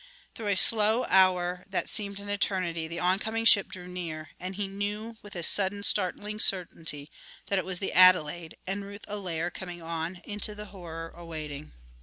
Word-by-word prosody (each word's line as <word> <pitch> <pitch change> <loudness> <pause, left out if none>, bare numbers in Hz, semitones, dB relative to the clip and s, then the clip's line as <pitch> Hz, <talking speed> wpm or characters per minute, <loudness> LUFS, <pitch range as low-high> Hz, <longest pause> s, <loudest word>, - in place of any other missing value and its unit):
Through 220 - -7
a 200 - +1
slow 220 +3 +7
hour 180 -1 +3
that 190 - -2
seemed 200 -2 -1
an 200 - -8
eternity 185 -5 -2
the 170 +1 -6
oncoming 215 +5 0
ship 205 -3 +6
drew 185 -2 -9
near, 170 -3 -6
and 185 +1 -6
he 200 0 -3
knew 205 +3 -4
with 205 -2 -13
a 175 - -4
sudden, 200 +3 +3
startling 205 +2 0
certainty 165 -7 +1 0.4
that 200 - +1
it - - -5
was 185 -1 -3
the 190 - -4
Adelaide 175 -3 +4
and 195 +2 -4
Ruth 200 +1 -10
Allaire 175 -5 -4
coming 175 -1 -8
on, 165 +2 -4
through 175 - -17
into 210 0 -3
the 210 0 -8
horror 165 -3 -8
awaiting. 155 -4 -8
185 Hz, 180 wpm, -27 LUFS, 170-205 Hz, 0.4 s, slow